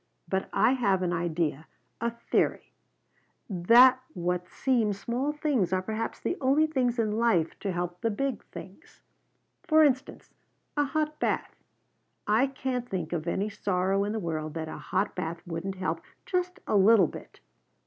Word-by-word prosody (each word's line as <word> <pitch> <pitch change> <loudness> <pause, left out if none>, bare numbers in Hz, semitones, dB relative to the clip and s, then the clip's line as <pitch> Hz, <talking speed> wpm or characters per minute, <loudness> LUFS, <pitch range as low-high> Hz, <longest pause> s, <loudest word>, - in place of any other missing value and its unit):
But 190 0 -2
I 220 +4 +4
have 200 -8 +1
an 175 -1 0
idea, 165 -3 -1 0.3
a 235 - +1 0.2
theory, - - +1 0.7
that 240 +7 +6
what 180 0 -2
seem 235 -6 +1
small 240 +8 -2
things 290 - 0
are 185 0 +1
perhaps 220 +3 -3
the 360 - -2
only 280 +4 +4
things 255 -6 0
in 220 -2 +1
life 200 -9 +1
to 195 - -2
help 175 0 -4
the 230 - +1
big 255 +2 -2
things. 195 - -12 0.6
For 315 -3 +5
instance, 265 -2 0 0.4
a 290 -1 +2
hot 305 +1 -2
bath. - - -1 0.7
I 220 +6 +3
can't 260 -2 -3
think 175 -3 -3
of 165 -1 -3
any 195 +4 0
sorrow 195 0 0
in 205 - -2
the 220 - -2
world 155 -4 -4
that 160 -1 -3
a 155 - -6
hot 190 +6 -1
bath 170 -1 -4
wouldn't 175 +3 -4
help, 175 -3 -2 0.2
just 360 0 -2
a - - 0
little 200 0 +6
bit." - - -11
205 Hz, 160 wpm, -28 LUFS, 175-260 Hz, 0.7 s, that